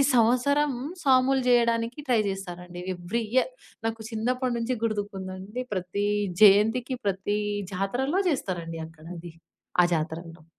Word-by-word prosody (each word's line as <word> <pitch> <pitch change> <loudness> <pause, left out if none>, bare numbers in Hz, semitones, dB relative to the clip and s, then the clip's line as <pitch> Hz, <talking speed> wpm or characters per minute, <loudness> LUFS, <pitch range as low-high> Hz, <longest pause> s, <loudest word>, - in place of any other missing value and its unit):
సంవత్సరం 255 +5 +3 0.3
సాములు 265 0 +4
జేయడానికి 235 +1 +2
ట్రై 235 -3 +4
జేస్తారండి. 180 -2 -6 0.2
ఎవ్రి 180 +7 -2
ఇయర్ 260 - +3 0.4
నాకు 225 0 -3
చిన్నప్పటి 250 +3 0
నుంచి 230 +2 -1
గుర్తుకుందండి 200 0 -4
ప్రతి 185 +2 -2 0.4
జయంతికి 220 +5 +5
ప్రతి 200 +1 0 0.3
జాతరలో 245 - -1
చేస్తారండి 175 - -2
అక్కడ 160 -1 -15
అది 170 0 -9 0.5
ఆ - - +5
జాతరలో. 165 0 -5
210 Hz, 115 wpm, -27 LUFS, 185-250 Hz, 0.5 s, జయంతికి